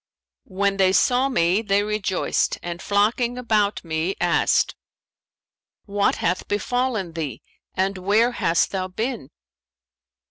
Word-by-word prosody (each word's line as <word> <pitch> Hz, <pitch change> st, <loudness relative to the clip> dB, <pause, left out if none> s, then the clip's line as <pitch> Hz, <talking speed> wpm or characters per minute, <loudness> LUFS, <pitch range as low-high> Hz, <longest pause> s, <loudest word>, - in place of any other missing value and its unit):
When 195 Hz, +1 st, 0 dB
they 190 Hz, -1 st, +3 dB
saw 250 Hz, +6 st, +3 dB
me, 185 Hz, -4 st, +2 dB
they 200 Hz, -2 st, +1 dB
rejoiced 210 Hz, -3 st, -1 dB
and 175 Hz, 0 st, -5 dB
flocking 230 Hz, +4 st, +1 dB
about 215 Hz, -4 st, 0 dB
me, 165 Hz, +3 st, -2 dB
asked, -, -, +2 dB, 1.1 s
'What 200 Hz, -1 st, +1 dB
hath 180 Hz, +2 st, -1 dB
befallen 215 Hz, -3 st, -1 dB
thee, 150 Hz, -8 st, -5 dB, 0.3 s
and 190 Hz, 0 st, -1 dB
where 210 Hz, +6 st, +3 dB
hast 165 Hz, -8 st, +1 dB
thou 185 Hz, -1 st, -2 dB
been?' 220 Hz, -, -4 dB
200 Hz, 115 wpm, -23 LUFS, 185-225 Hz, 1.1 s, they